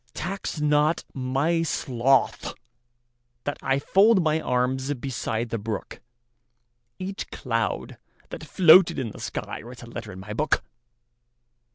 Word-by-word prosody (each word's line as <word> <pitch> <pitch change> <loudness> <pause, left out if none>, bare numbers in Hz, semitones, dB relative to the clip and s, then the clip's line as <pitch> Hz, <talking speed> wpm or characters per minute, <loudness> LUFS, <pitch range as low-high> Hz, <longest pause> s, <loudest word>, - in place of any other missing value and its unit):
Tax 195 -3 -4
not 150 +2 +2
my 135 +6 0
sloth 135 -4 +1 0.9
that 145 - -3
IFold 190 +11 +4
my 155 0 +1
arms 130 +1 0
beside 120 -3 -3
the 115 - -1
brook; 110 0 -5 1.0
Each 190 +1 -5
cloud 115 -3 -2 0.3
that - - -7
floated 175 0 +6
in 120 -5 -3
the - - -11
skyWrites 120 +1 -6
a 120 - -10
letter 115 -3 -7
in 95 - -9
my 105 +3 -7
book. 150 +8 +1
135 Hz, 120 wpm, -25 LUFS, 120-160 Hz, 1.0 s, floated